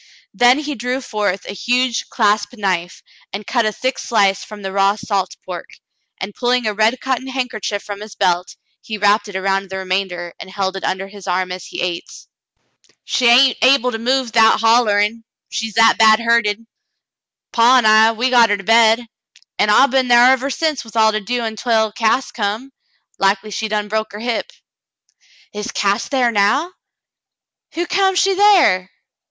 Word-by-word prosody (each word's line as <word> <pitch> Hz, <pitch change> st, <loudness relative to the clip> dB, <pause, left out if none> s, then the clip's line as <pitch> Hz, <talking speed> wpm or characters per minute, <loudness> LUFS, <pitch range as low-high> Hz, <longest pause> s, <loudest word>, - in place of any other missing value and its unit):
Then 245 Hz, +2 st, +4 dB
he 300 Hz, 0 st, -4 dB
drew 250 Hz, +1 st, -3 dB
forth 205 Hz, -6 st, -3 dB
a -, -, -6 dB
huge 245 Hz, +3 st, -1 dB
clasp 210 Hz, -2 st, 0 dB
knife 185 Hz, -6 st, -3 dB, 0.3 s
and 200 Hz, +1 st, -6 dB
cut 235 Hz, -4 st, 0 dB
a -, -, 0 dB
thick 255 Hz, +4 st, -3 dB
sHce 200 Hz, -4 st, +1 dB
from 210 Hz, -1 st, -11 dB
the 190 Hz, -, -4 dB
raw 195 Hz, +1 st, +2 dB
salt 195 Hz, -4 st, -3 dB
pork, 180 Hz, -2 st, -9 dB, 0.4 s
and 195 Hz, +2 st, -6 dB
pulhng 245 Hz, +1 st, 0 dB
a 215 Hz, -, -1 dB
red 220 Hz, +4 st, +1 dB
cotton 260 Hz, 0 st, -3 dB
handkerchief 250 Hz, -6 st, -4 dB
from 205 Hz, 0 st, -8 dB
his 215 Hz, 0 st, -10 dB
belt, 180 Hz, 0 st, -1 dB, 0.3 s
he 220 Hz, -, -6 dB
wrapped 205 Hz, +1 st, +2 dB
it 205 Hz, -, -11 dB
around 195 Hz, 0 st, -1 dB
the 190 Hz, -, -5 dB
re 190 Hz, -, -6 dB
mamder 185 Hz, -2 st, -3 dB
and -, -, -10 dB
held 190 Hz, 0 st, -3 dB
it 195 Hz, -, -7 dB
under 195 Hz, +1 st, -3 dB
his 200 Hz, -1 st, -13 dB
arm 185 Hz, 0 st, -1 dB
as 180 Hz, -1 st, -7 dB
he -, -, -7 dB
ate. 175 Hz, -1 st, -4 dB, 0.9 s
"She 250 Hz, -, 0 dB
hain't 250 Hz, +2 st, +5 dB
able 255 Hz, -1 st, +3 dB
to 225 Hz, -, -5 dB
move 255 Hz, +1 st, -1 dB
'thout 225 Hz, -1 st, +4 dB
hollerin', 225 Hz, -1 st, +2 dB, 0.3 s
she's 220 Hz, -2 st, -5 dB
that 225 Hz, 0 st, +4 dB
bad 220 Hz, -1 st, +6 dB
hurted. 230 Hz, -2 st, 0 dB, 0.9 s
Paw 240 Hz, +2 st, +4 dB
an* 245 Hz, -, +2 dB
I, 220 Hz, +1 st, +5 dB
we 245 Hz, +3 st, -1 dB
got 235 Hz, -2 st, +5 dB
her 205 Hz, -, +1 dB
to 195 Hz, -, -10 dB
bed, 225 Hz, +2 st, +4 dB, 0.5 s
an' 210 Hz, -, +2 dB
I 210 Hz, +6 st, +6 dB
been 265 Hz, -1 st, 0 dB
thar 245 Hz, +1 st, +6 dB
ever 265 Hz, +1 st, 0 dB
since 310 Hz, 0 st, -2 dB
with 225 Hz, -1 st, -15 dB
all 220 Hz, -1 st, +4 dB
to 215 Hz, -, -2 dB
do 240 Hz, +4 st, -3 dB
ontwell 220 Hz, -1 st, -1 dB
Cass 225 Hz, +5 st, 0 dB
come. 220 Hz, +5 st, -4 dB, 0.5 s
Likely 195 Hz, +2 st, 0 dB
she 220 Hz, +2 st, -3 dB
done 210 Hz, -1 st, -2 dB
broke 220 Hz, 0 st, -3 dB
her 205 Hz, -, -8 dB
hip." 240 Hz, -, -3 dB, 1.0 s
"Is 210 Hz, +4 st, -5 dB
Cass 200 Hz, 0 st, -1 dB
thar 255 Hz, -4 st, +1 dB
now? 235 Hz, -, +1 dB, 1.0 s
Hu' 345 Hz, +1 st, -2 dB
come 385 Hz, +1 st, +1 dB
she 390 Hz, +1 st, +2 dB
thar 370 Hz, -, +3 dB
?" -, -, -45 dB
220 Hz, 185 wpm, -18 LUFS, 200-245 Hz, 1.0 s, bad